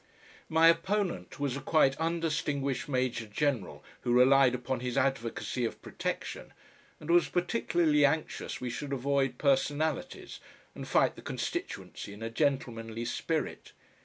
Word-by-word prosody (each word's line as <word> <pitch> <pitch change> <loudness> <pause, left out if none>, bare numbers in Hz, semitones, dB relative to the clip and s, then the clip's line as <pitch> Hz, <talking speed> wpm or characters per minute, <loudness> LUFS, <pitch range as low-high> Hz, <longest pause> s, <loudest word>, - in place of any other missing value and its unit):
My 160 +1 +5
opponent 180 +2 +1
was 140 -3 -1
a 140 - -5
quite 140 -4 +3
undistinguished 155 -5 -1
Major 125 -4 -1
General 125 0 -1 0.2
who 120 - -1
relied 130 +1 +6
upon 125 0 -3
his 125 0 -3
advocacy 125 -1 -1
of 115 - -2
Protection, - - -5 0.5
and 155 +2 -3
was 175 -1 +4
particularly 175 -5 +2
anxious 150 +2 0
we 125 -1 -3
should 140 +3 -4
avoid 135 -1 0
"personalities" 145 +2 0 0.3
and - - -8
fight - - +3
the - - -11
constituency 100 - -5
in 105 +2 -9
a 115 - -4
gentlemanly 120 -4 -1
spirit. 155 +6 -3
140 Hz, 130 wpm, -30 LUFS, 125-155 Hz, 0.5 s, relied